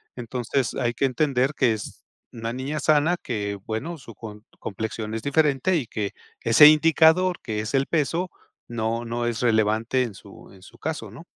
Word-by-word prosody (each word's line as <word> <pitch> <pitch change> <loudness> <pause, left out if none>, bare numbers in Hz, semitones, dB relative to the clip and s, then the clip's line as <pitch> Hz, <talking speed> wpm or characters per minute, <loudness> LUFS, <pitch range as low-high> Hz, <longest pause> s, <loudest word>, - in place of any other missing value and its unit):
"Entonces 120 +1 -2
hay 120 -3 0
que - - +1
entender 135 0 +1
que 115 - +3
es 105 -1 -8 0.3
una 115 0 -5
niña 135 +4 -3
sana 155 +3 +3
que, 100 -5 -3
bueno, 135 +11 -4
su 120 -3 -12
com 105 0 -10 0.2
complexión 110 +1 -5
es 115 - -3
diferente 150 +3 +2
y 130 -8 -3
que 100 -2 -3 0.3
que - - -4
ese 150 +6 +10
indicador, 160 +3 +5
que 105 -1 -4
es 110 +4 -4
el 135 0 +2
peso, 165 +4 0 0.4
no 115 0 -2
no 120 +1 -2
es 120 0 -2
relevante 110 +2 +2
en 115 -4 -5
su 100 0 -14
en 95 - -17
su - - -16
caso", - - -4
¿no? - - -12
120 Hz, 185 wpm, -24 LUFS, 110-150 Hz, 0.4 s, ese